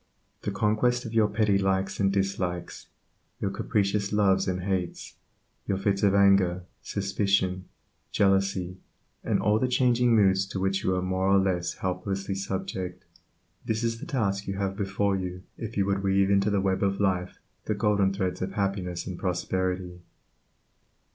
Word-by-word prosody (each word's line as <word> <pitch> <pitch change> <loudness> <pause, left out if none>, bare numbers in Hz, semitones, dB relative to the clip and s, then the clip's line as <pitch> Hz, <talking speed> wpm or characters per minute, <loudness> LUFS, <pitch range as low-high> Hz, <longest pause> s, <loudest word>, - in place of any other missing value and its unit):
The - - -3
conquest 110 +5 +1
of 115 - -6
your 110 -2 +4
petty 105 -1 +2
likes 95 0 0
and 95 -1 +3
dislikes, 95 -3 -2 0.5
your 100 - -1
capricious 100 -1 0
loves 95 -2 +3
and 90 -1 -2
hates, 95 -2 -3 0.5
your 95 - 0
fits 100 0 0
of 100 -1 +3
anger, 95 -3 +4 0.2
suspicion, 100 -2 0 0.5
jealousy, 95 -2 +1 0.4
and - - +1
all 105 +1 +2
the 130 - +1
changing 125 -2 +3
moods 95 -2 +3
to 95 - -4
which 95 +1 0
you 95 - +1
are 90 - -1
more 95 +1 0
or 100 0 +5
less 90 -3 0
helplessly 95 +1 -3
subject, 95 -1 -4 0.6
this 110 +1 -2
is 115 0 -1
the - - -8
task 105 - -1
you 100 - -2
have 95 -1 -2
before 100 0 0
you 90 -1 -5
if 115 -1 -7
you 100 - +2
would 100 0 0
weave 95 0 +2
into 100 +1 +3
the 100 -2 +1
web 95 -1 0
of 100 -1 0
life 90 -2 0 0.3
the 110 - -1
golden 100 -2 +2
threads 95 -2 -2
of 95 +1 -3
happiness 95 -3 -2
and 90 -2 -6
prosperity. 90 0 -2
95 Hz, 160 wpm, -27 LUFS, 95-100 Hz, 0.6 s, or